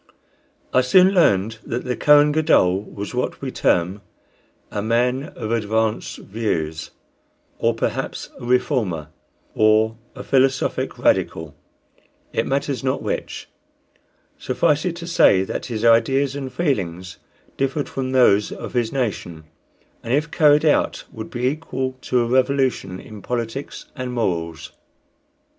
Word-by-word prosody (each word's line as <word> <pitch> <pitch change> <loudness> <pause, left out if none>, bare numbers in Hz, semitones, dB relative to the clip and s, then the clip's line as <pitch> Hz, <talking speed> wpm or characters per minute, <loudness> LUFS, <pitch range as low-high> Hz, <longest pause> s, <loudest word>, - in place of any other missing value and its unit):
I 130 - +5
soon 185 +9 +5
learned 110 - +2
that 120 +2 -4
the 125 -1 -1
Kohen 150 0 +5
Gadol 145 - +3
was 100 +1 -8
what 125 - -2
we 135 -2 -5
term 90 0 +1 0.7
"a 105 - -2
man 125 +5 +1
of 110 -3 -5
advanced 110 -1 -1
views," 80 -7 -3 0.7
or - - +1
perhaps - - -3
a - - -11
"Reformer," 120 - 0 0.4
or 110 +1 +3 0.2
a - - -7
"Philosophic 135 0 +1
Radical," 80 -3 0 0.8
it - - 0
matters 135 0 -1
not 130 0 -1
which; - - -4 0.9
suffice 150 0 +1
it 175 -2 -1
to 170 0 -8
say 100 - +4
that - - -5
his 115 -2 -3
ideas 135 +4 +3
and 135 -2 -5
feelings 95 - -2 0.4
differed 135 +2 -1
from 130 -1 -4
those 105 -6 +4
of - - -7
his 120 -3 0
nation, 100 -11 -3 0.6
and 115 +3 0
if 155 +2 -1
carried 150 -1 +4
out 150 - +2
would 110 -1 -8
be 120 +1 -3
equal 130 -2 -2
to 125 -1 +1
a - - +1
revolution 130 -6 +1
in 105 -2 -11
politics 120 +4 -4
and 125 -1 -5
morals. 85 -6 -2
125 Hz, 135 wpm, -21 LUFS, 105-135 Hz, 0.9 s, I